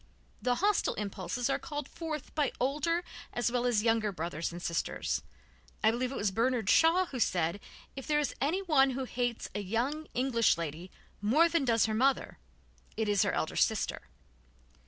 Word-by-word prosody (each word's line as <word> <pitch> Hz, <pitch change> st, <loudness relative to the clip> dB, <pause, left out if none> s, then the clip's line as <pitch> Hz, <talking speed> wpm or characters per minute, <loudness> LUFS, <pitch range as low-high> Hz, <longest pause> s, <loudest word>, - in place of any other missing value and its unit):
The 250 Hz, -1 st, +1 dB
hostile 405 Hz, +8 st, +1 dB
impulses 200 Hz, +3 st, -3 dB
are 275 Hz, -, 0 dB
called 295 Hz, -2 st, -5 dB
forth 315 Hz, -4 st, -6 dB
by 295 Hz, -4 st, +1 dB
older 300 Hz, +7 st, 0 dB, 0.3 s
as 240 Hz, -1 st, 0 dB
well 245 Hz, 0 st, +1 dB
as 220 Hz, -4 st, +2 dB
younger 225 Hz, -2 st, +2 dB
brothers 165 Hz, -2 st, -3 dB
and 175 Hz, -, -7 dB
sisters. 170 Hz, -2 st, -2 dB, 0.6 s
I 220 Hz, -, +6 dB
believe 250 Hz, +2 st, -2 dB
it -, -, -5 dB
was 205 Hz, -1 st, 0 dB
Bernard 230 Hz, 0 st, +1 dB
Shaw 335 Hz, +3 st, +5 dB
who 265 Hz, -7 st, -6 dB
said: 175 Hz, -3 st, +1 dB, 0.4 s
"If 270 Hz, -, -7 dB
there 300 Hz, -1 st, +2 dB
is 295 Hz, -, -1 dB
anyone 305 Hz, -3 st, +3 dB
who 265 Hz, -, -1 dB
hates 245 Hz, -2 st, -2 dB
a 205 Hz, -, -2 dB
young 245 Hz, +10 st, -2 dB
English 240 Hz, -6 st, +3 dB
lady 165 Hz, +2 st, -5 dB, 0.3 s
more 275 Hz, +11 st, +4 dB
than 335 Hz, -4 st, +1 dB
does 230 Hz, -3 st, +3 dB
her 220 Hz, -, -1 dB
mother, 265 Hz, +5 st, +1 dB, 0.6 s
it 220 Hz, -1 st, 0 dB
is 205 Hz, -2 st, +3 dB
her 200 Hz, -3 st, +2 dB
elder 160 Hz, -, -1 dB
sister." 215 Hz, -, 0 dB
245 Hz, 175 wpm, -31 LUFS, 205-285 Hz, 0.6 s, I